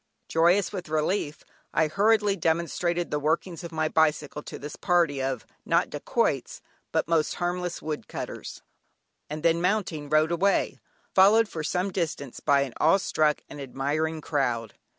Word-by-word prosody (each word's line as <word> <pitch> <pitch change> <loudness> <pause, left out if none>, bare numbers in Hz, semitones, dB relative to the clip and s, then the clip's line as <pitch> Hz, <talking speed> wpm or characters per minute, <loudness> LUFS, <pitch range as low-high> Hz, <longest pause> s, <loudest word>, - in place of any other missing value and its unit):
Joyous 175 +5 +3
with 180 -5 -5
relief 155 -1 -1 0.3
I 160 - +4
hurriedly 205 +4 +3
demonstrated 170 +1 0
the 150 - 0
workings 160 +3 -1
of 170 - -7
my 155 -1 0
bicycle 150 -2 +1
to - - -8
this 145 +1 -7
party 170 -6 +2
of, 130 -2 -2 0.2
not - - +1
dacoits, - - -1 0.3
but - - 0
most 165 -2 +1
harmless 175 0 -3
wood 155 -1 -4
cutters, - - -7 0.7
and 150 +1 -5
then 165 0 +3
mounting 180 -6 -1
rode 155 +2 +3
away, 195 +4 +1 0.3
followed 210 +4 +6
for 160 -6 -5
some 180 +4 -1
distance 155 -7 -3
by 140 -2 +3
an 135 -4 -3
awe 165 +5 +6
struck 155 -5 +1
and 145 - -9
admiring 150 +4 -2
crowd. 120 -8 -1
160 Hz, 150 wpm, -27 LUFS, 150-180 Hz, 0.7 s, followed